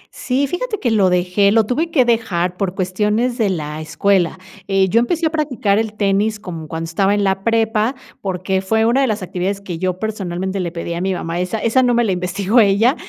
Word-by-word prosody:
Sí, 270 +2 0
fíjate 425 - -3
que 240 - 0
lo 200 -4 +3
dejé, 180 +3 +2
lo 220 0 +4
tuve 310 +9 -1
que 265 -7 +3
dejar 180 -7 0
por 190 -1 -2
cuestiones 210 +7 0
de 210 -3 +2
la 155 -3 -4
escuela, 180 +3 +1 0.3
eh, 195 -1 +2
yo 230 +5 +3
empecé 325 +8 0
a 315 - +1
practicar 255 -10 0
el 220 -1 -3
tenis 205 +1 +1
como 165 -6 -7
cuando 165 +1 -4
estaba 195 +5 +1
en 205 - 0
la 195 0 0
prepa, 225 +2 +1 0.3
porque 190 0 -1
fue 220 +3 +1
una 240 +4 +3
de 270 - +2
las 215 -4 -2
actividades 185 +2 -2
que 180 -4 -6
yo 185 0 -1
personalmente 190 -2 -3
le 175 -2 -2
pedí 170 0 -5
a 170 - -3
mi 190 0 0
mamá, 170 0 -3
esa 180 +4 -2
esa 230 +4 +2
no 245 -1 +2
me 240 - +3
la 210 - 0
investigó 190 +5 +1
ella, 220 +6 +4
200 Hz, 220 wpm, -18 LUFS, 180-230 Hz, 0.3 s, lo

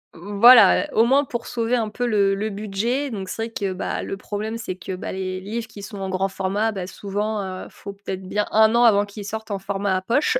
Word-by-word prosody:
V - - -13 0.2
voilà, 240 +1 +8
heu, - - -9
au 225 - +5
moins 275 +4 +4
pour 235 -3 -5
sauver 235 +1 -1
un 225 -3 0
peu 245 +3 -2
le 200 -3 +3
le 210 +2 -2
budget, 215 +7 -2
donc 195 -4 -5
c'est 225 - -3
vrai 230 - -5
que, 195 -2 -2
bah, 185 - -3
le 195 - -5
problème, 215 +3 -4
c'est 220 -5 -5
que, 185 +1 -6
bah, - - -6
les 185 0 -4
livres 225 +4 -5
qui 205 -2 -11
sont 200 0 -8
en 190 0 -3
grand 190 +1 0
format, 195 +3 -1
bah, 185 -3 -5
souvent, 205 +2 -3
heu, 185 -1 -6
faut 200 - -9
peut 200 -1 -6
être 185 0 -7
bien 210 +1 -1
1 220 +1 +5
an 235 - +4
avant 205 -2 +5
qu'ils 205 0 -9
sortent 220 +1 -6
en 200 - -2
format 195 -1 -1
poche 250 - +1
205 Hz, 255 wpm, -22 LUFS, 195-225 Hz, 0.2 s, voilà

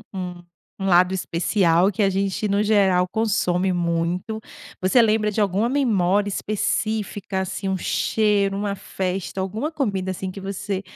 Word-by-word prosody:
um 180 -2 -6 0.4
um 195 - -2
lado 180 +1 +4
especial 180 +1 +2
que 205 - -1
a 195 - +3
gente, 195 +2 -1
no 200 +1 +1
geral, 195 -4 +3
consome 190 -3 0
muito. 175 +5 -1 0.4
Você 190 +7 +4
lembra 215 -1 +3
de 210 - -2
alguma 205 +3 +1
memória 205 -7 +2
específica, 205 -1 -2
assim, 190 +1 -4
um 190 - 0
cheiro, 200 +1 +1
uma 200 0 -2
festa, 190 0 -4
alguma 215 +11 -2
comida, 200 - -2
assim, 185 0 -4
que 195 - -8
você 195 0 -4
195 Hz, 150 wpm, -23 LUFS, 185-210 Hz, 0.4 s, lado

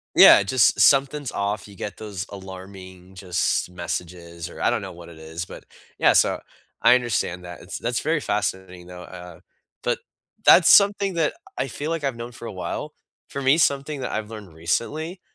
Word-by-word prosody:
Yeah, - - +9
just 115 +5 +3
something's 140 -1 +3
off. 100 +1 -2
You 100 - -14
get 100 - -6
those 100 -4 -6
alarming, 95 -1 -11
just 90 -1 -1
messages, 85 -1 -6
or - - -11
I - - +2
don't 120 -3 0
know 95 -1 -7
what 85 0 -12
it 80 -2 -13
is. 80 +2 -6
But, - - -11 0.3
yeah, - - +5
so - - +3 0.4
I 115 +2 +7
understand 110 -7 -1
that. 90 -1 -9
It's 90 - -7
that's 120 0 -2
very 155 +1 0
fascinating, 95 -5 -3
though. 90 0 -10
Uh, 90 -1 -11 0.4
but - - 0 0.5
that's 175 - +7
something 200 -1 +5
that 165 -3 +1 0.2
I - - -1
feel 145 +6 -5
like 165 -3 -3
I've 135 -3 -1
known 120 +1 -7
for - - -12
a - - -6
while. - - -5 0.4
For 140 - -4
me, 135 +3 +4
something 140 -2 +1
that 130 - -4
I've 110 -1 -3
learned 105 -6 -10
recently, 150 - -3
100 Hz, 190 wpm, -23 LUFS, 90-135 Hz, 0.5 s, Yeah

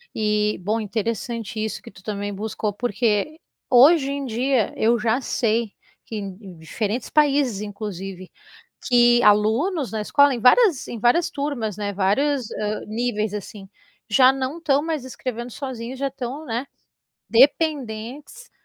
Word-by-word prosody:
E, 210 -1 +1
bom 215 +5 -1
interessante 220 0 -3
isso 220 - -4
que - - -11
tu 185 - -16
também 205 -1 -4
buscou, 210 +1 -3
porque, 235 +6 -1 0.3
hoje 275 +3 +6
em 280 0 -3
dia, 250 0 0
eu 230 +2 +2
já 225 +4 +1
sei 230 -3 -1 0.3
que 225 - -7
em 200 -3 -5
em 190 -5 -11
diferentes 210 +8 -3
países, 280 -8 +2
inclusive, 195 -3 -7 0.6
que 240 -1 +5
alunos 225 - +2
na 220 - -2
escola, 285 +6 +4
em 245 - -3
várias 305 - +4
em 235 - -6
várias 245 +10 +3
turmas, 275 -8 -3
né, 205 -1 -3
vários, 235 +7 +1
hã, 210 0 -3
níveis, 215 -2 -2
assim, 200 -1 -8 0.4
já 255 +4 +6
não 270 +3 -3
estão 285 -4 +2
mais 315 -5 -3
escrevendo 245 -1 -6
sozinhos, 255 -1 -6
já 275 - 0
estão, 270 +2 -6
né, 240 +1 -3 0.7
dependentes 275 - +1
235 Hz, 145 wpm, -22 LUFS, 210-270 Hz, 0.7 s, hoje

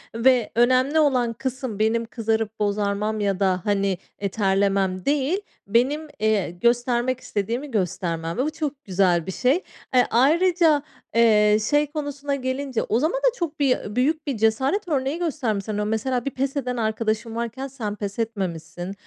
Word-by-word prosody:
ve 245 0 +3
önemli 255 +5 +3
olan 255 -6 +2
kısım 255 -2 -4
benim 225 +2 +1
kızarıp 225 -1 -2
bozarmam 210 +1 0
ya 200 -2 0
da 185 -2 +1
hani, 200 -2 +1 0.2
e, 200 - -1
terlemem 195 -2 +1
değil, 290 +7 +1 0.3
benim, 265 +9 +1
eee, 215 -5 +1
göstermek 240 +5 +1
istediğimi 235 +8 -3
göstermem 170 -4 -2
ve 255 - +1
bu 310 - -1
çok 290 -3 -4
güzel 180 -3 +2
bir 190 - -4
şey. 260 - +1 0.3
Eee, 250 - +5
ayrıca, 320 +4 +4 0.3
eee, 210 -2 +5
şey 295 0 +3
konusuna 290 -2 -3
gelince 260 -1 -2
o 225 - +1
zaman 315 - +1
da - - +2
çok 330 -7 -4
bir 250 -6 0
büyük 305 +5 +1
bir 275 -5 -1
cesaret 265 - +1
örneği 285 +1 -1
göstermişsin, 220 - -2
o 210 - 0
mesela 235 +3 -1
bir 275 - -1
pes 270 +2 -2
eden 250 -2 -2
arkadaşın 220 0 -1
varken 235 +3 -4
sen 230 -6 -5
pes 205 0 -5
etmemişsin, 180 -5 -4
235 Hz, 155 wpm, -23 LUFS, 205-275 Hz, 0.3 s, Eee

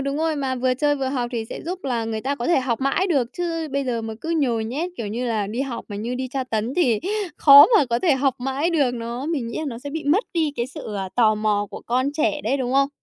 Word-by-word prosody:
đúng 275 +1 -2
rồi, 320 0 0
mà 270 -2 -1
vừa 255 0 +1
chơi 290 +2 +1
vừa 270 -1 -2
học 250 -3 -2
thì 230 -2 -2
sẽ - - -8
giúp 360 +2 -3
là 240 -4 -1
người 220 -1 -3
ta 275 +5 -1
có 240 - -4
thể 340 -5 +3
học 255 -1 -2
mãi 275 +8 +1
được. 270 -9 +1
Chứ 330 -3 -3
bây 280 0 0
giờ 235 -3 -2
mà 220 0 -5
cứ 325 - -4
nhồi 245 -9 +1
nhét, 300 +10 -3
kiểu 220 - -4
như 235 +5 -3
là, 215 -4 -1
đi 225 +5 -4
học 270 -3 -4
mà 205 - -6
như 235 +4 -3
đi 260 0 -3
tra 265 -1 -2
tấn 230 +1 -2
thì 250 -12 +3 0.4
khó 280 0 +9
mà 390 - +5
có 235 - +2
thể 310 0 +3
học 265 -1 +1
mãi 270 +6 -1
được, 285 -7 +2
nó 235 +3 -5
mình 290 -8 -2
nghĩ 230 - -5
là 315 - -3
nó 230 -2 -6
sẽ 285 +3 -7
bị 315 0 -5
mất 330 +11 +2
đi 315 -3 +1
cái 235 0 -1
sự, 265 -6 -8
à, 190 -1 -3
tò 220 -3 +4
mò 210 -1 0
của - - -8
con 255 +4 0
trẻ 300 0 0
đấy, 260 +5 +1
đúng 255 -2 -2
không? 275 +1 +3
260 Hz, 290 wpm, -22 LUFS, 235-290 Hz, 0.4 s, khó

